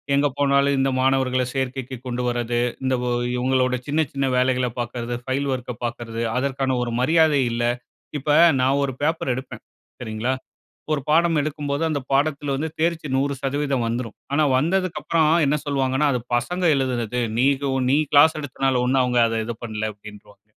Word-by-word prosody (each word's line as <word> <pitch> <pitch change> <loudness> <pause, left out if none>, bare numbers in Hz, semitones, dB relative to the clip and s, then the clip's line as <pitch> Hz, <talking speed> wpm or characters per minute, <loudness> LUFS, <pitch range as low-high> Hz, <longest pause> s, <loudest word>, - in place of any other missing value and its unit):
எங்க 140 +1 +3
போனாலும் 140 0 +3
இந்த 135 0 +2
மாணவர்கள 130 -1 +2
சேர்க்கைக்கு 130 -1 -3
கொண்டு 125 0 -3
வர்றது, 120 -1 -1 0.2
இந்த 130 0 +1
ஒ - - 0 0.3
இவுங்களோட 130 0 +1
சின்ன, 150 +3 +1
சின்ன 135 -1 0
வேலைகள 125 0 +2
பாக்குறது 120 0 -3
ஃபைல் 135 +2 -1
ஒர்க்க 125 -1 -4
பாக்குறது, 115 -1 -4 0.2
அதற்கான 135 -1 0
ஒரு 120 - -3
மரியாதை 155 +1 +4
இல்ல. 120 0 -1 0.5
இப்ப 145 +1 -5 0.3
நான் 135 +2 +2
ஒரு 135 - -1
பேப்பர் 150 -3 0
எடுப்பேன். 130 +1 -7 0.4
சரிங்களா? 110 +2 -2 0.6
ஒரு 150 - 0
பாடம் 165 0 +3
எடுக்கும்போது, 145 0 -3
அந்த 145 -2 -1
பாடத்துல 140 0 +1
வந்து 155 +2 -3
தேர்ச்சி 165 -2 0
100% 140 -1 -1
வந்துரும். 115 -1 -4 0.2
ஆனா, 155 +1 +3
வந்ததுக்கு 185 +4 0
அப்புறம் 160 -2 +2 0.2
என்ன 150 +2 +1
சொல்வாங்கன்னா, 135 +1 +1
அது 125 - -1 0.2
பசங்க 180 +10 -2
எழுதுனது. 125 -2 -1 0.2
நீகவு 135 0 +1
நீ 140 - +4 0.2
கிளாஸ் 155 +2 +6
எடுத்தனால 135 -3 0
ஒண்ணும் 130 0 +3
அவுங்க 125 -1 +2
அத 115 0 -1
இது 120 -1 -4
பண்ல, 110 -1 -3
அப்பிடின்றுவாங்க. 105 0 -15
135 Hz, 155 wpm, -22 LUFS, 125-145 Hz, 0.6 s, கிளாஸ்